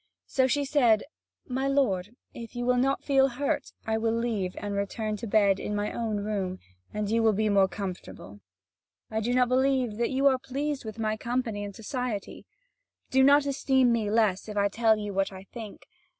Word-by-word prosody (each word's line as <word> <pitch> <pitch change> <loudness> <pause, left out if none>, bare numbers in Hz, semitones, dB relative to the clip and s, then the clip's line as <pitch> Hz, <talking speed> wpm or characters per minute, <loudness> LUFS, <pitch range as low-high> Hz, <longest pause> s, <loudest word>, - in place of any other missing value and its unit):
So 260 -1 +2
she 285 +2 0
said: 245 -7 +3 0.4
"My 265 +1 -1
lord, 235 -7 0 0.2
if 230 +1 -9
you 240 0 -2
will 250 0 +3
not 270 +2 +1
feel 270 -1 +4
hurt, 275 +2 -2
I 220 0 0
will 225 0 0
leave 220 -6 -2
and 205 -1 -4
return 210 +2 -2
to 230 - -6
bed 200 -2 +3
in 210 - -3
my 205 0 -2
own 220 -3 -2
room, 195 -3 -2 0.3
and 210 -1 -2
you 225 +2 +1
will 220 -1 +4
be 215 +1 +1
more 195 -1 +4
comfortable. 180 - -7 0.7
I 220 - 0
do 225 +3 -1
not 250 0 +4
believe 255 -3 +1
that 235 0 0
you 265 +1 0
are 265 -2 +5
pleased 275 +1 -3
with 220 +1 -7
my 215 -1 -1
company 235 -3 -2
and 200 -1 -7
society. 235 -3 -5 0.6
Do 265 - +4
not 285 +1 +6
esteem 265 -2 +2
me 225 -3 0
less 215 -2 +1
if 210 - -5
I 200 0 +3
tell 220 +1 +3
you 210 -1 -4
what 195 +1 0
I 190 0 -10
think. 215 0 -10
225 Hz, 195 wpm, -27 LUFS, 205-255 Hz, 0.7 s, not